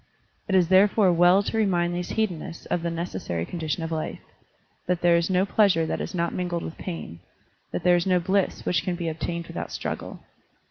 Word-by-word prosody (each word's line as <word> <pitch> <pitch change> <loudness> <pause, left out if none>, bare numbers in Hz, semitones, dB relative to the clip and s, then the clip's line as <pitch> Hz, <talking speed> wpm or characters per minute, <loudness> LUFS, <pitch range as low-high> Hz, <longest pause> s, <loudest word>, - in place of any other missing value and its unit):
It 195 - +1
is 180 -2 +4
therefore 190 0 +5
well 175 +3 +5
to 225 - -3
remind 175 -4 +1
these 175 0 -3
hedonists 180 -6 -3
of 175 - -1
the 170 - -1
necessary 165 - -3
condition 165 - -3
of 165 - -4
life, 160 -1 -3 0.7
that 180 -1 0
there 175 -1 +5
is 170 +1 +1
no 185 +1 +3
pleasure 195 -6 +3
that - - -2
is - - -5
not 170 -1 -1
mingled 175 -2 -2
with 165 - -6
pain, 165 - -6 0.5
that - - -3
there 180 -1 +5
is 175 +1 0
no 180 -1 +3
bliss 190 +2 0
which 170 -3 +1
can 180 - -2
be 170 -1 -3
obtained 170 +2 -4
without - - -6
struggle. - - -5
175 Hz, 200 wpm, -25 LUFS, 165-185 Hz, 0.7 s, therefore